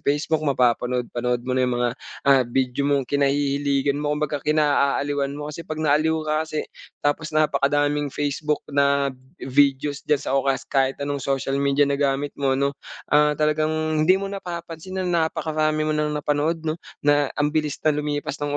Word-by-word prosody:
Facebook, 150 +2 0
mapapanood-panood 125 -3 0
mo 130 - -2
na 130 - +1
yung 125 - -1
mga, 120 0 +1 0.3
ah, 140 -1 +6
video 130 +2 0
mong 140 -2 +2
kinahihiligan 140 0 +1
mo, 150 0 -1
kumbaga 150 -1 -2
kinaaaliwan 145 -2 +1
mo. 150 0 -5
Kasi 165 - -7
'pag 155 - -5
naaliw 155 +1 +2
ka 155 0 0
kasi 155 -1 -2 0.4
tapos 150 +1 0
napakadaming 145 -1 +2
Facebook 145 +2 -2
na, 140 -1 +2 0.2
videos 140 +1 +1
diyan 150 - +4
sa - - -3
o 135 - +3
kas 135 - 0
kahit 135 -1 +1
anong 145 0 -3
social 135 0 -1
media 140 +1 +3
na 140 0 -1
gamit 140 0 0
mo, 135 -1 +2
'no, 140 +1 +1 0.4
ah, 150 0 +4
talagang 155 0 +1 0.3
hindi 185 +5 +5
mo 195 0 -4
napapansin 175 -1 -7
na 170 -3 +2
napakarami 155 -1 -1
mo 155 - 0
nang 150 0 -1
napanood, 150 +3 -1
'no? 155 +1 -2 0.2
Na 145 -1 +3
ang 145 0 +1
bilis 150 -2 0
na 155 - +4
lumipas 145 0 -3
ng 145 0 -1
145 Hz, 170 wpm, -23 LUFS, 140-155 Hz, 0.4 s, ah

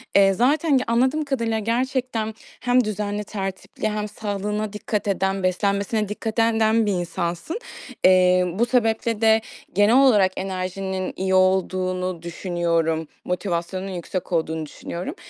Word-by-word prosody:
Eee, 195 -1 +6
zaten 280 - +3
ge 255 - +1
anladığım 260 +6 +2
kadarıyla 230 -5 -1
gerçekten 235 0 -1 0.3
hem 245 0 +3
düzenli, 210 -1 -3
tertipli 195 +1 -4
hem 210 0 -2
sağlığına 210 0 -3
dikkat 210 0 -3
eden, 190 0 0
beslenmesine 200 +3 0
dikkat 220 +1 -4
eden 225 0 +3
den 220 0 +3
bir 205 - +1
insansın. 175 - -3 0.4
Eee, 185 0 +5
bu 225 +6 +2
sebeple 230 -2 +1
de 220 0 +5 0.3
genel 205 +4 +4
olarak 215 -9 +5
enerjinin 190 0 -3
iyi 190 0 -1
olduğunu 185 -1 +1
düşünüyorum. 170 -2 -1 0.2
Motivasyonun 180 0 -2
yüksek 185 -1 -5
olduğunu 160 -2 -1
düşünüyorum. 170 +4 -6
200 Hz, 130 wpm, -23 LUFS, 185-225 Hz, 0.4 s, Eee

